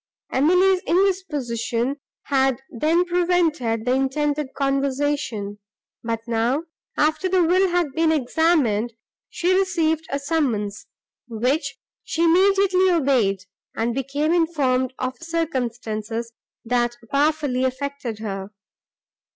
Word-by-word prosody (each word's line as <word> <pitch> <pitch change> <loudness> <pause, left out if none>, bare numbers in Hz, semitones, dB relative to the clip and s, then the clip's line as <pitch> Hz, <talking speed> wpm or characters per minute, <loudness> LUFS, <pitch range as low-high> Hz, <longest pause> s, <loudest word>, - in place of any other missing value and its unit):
Emily's 365 +7 +3
indisposition 285 - 0 0.3
had 265 -2 +1
then 320 +8 +2
prevented 335 -10 +1
the 250 - +1
intended 285 +1 0
conversation; 275 -6 -1 0.4
but 230 -1 -2
now, 235 +6 0 0.3
after 315 +5 +1
the 365 -1 +3
will 370 +3 +3
had 350 -4 0
been 320 +1 +2
examined, 260 -6 +1 0.4
she 355 +2 0
received 330 -4 +1
a 280 - -1
summons, 270 -9 -1 0.4
which 270 +5 -1 0.3
she 335 - -1
immediately 375 +2 +4
obeyed, 255 - +2 0.3
and 230 +1 0
became 280 +5 -1
informed 275 -7 +1
of 255 +4 -4
circumstances, 235 -8 -3 0.3
that 240 0 +1 0.2
powerfully 290 -3 +1
affected 260 -3 -3
her. 195 -3 -5
280 Hz, 100 wpm, -22 LUFS, 240-330 Hz, 0.4 s, immediately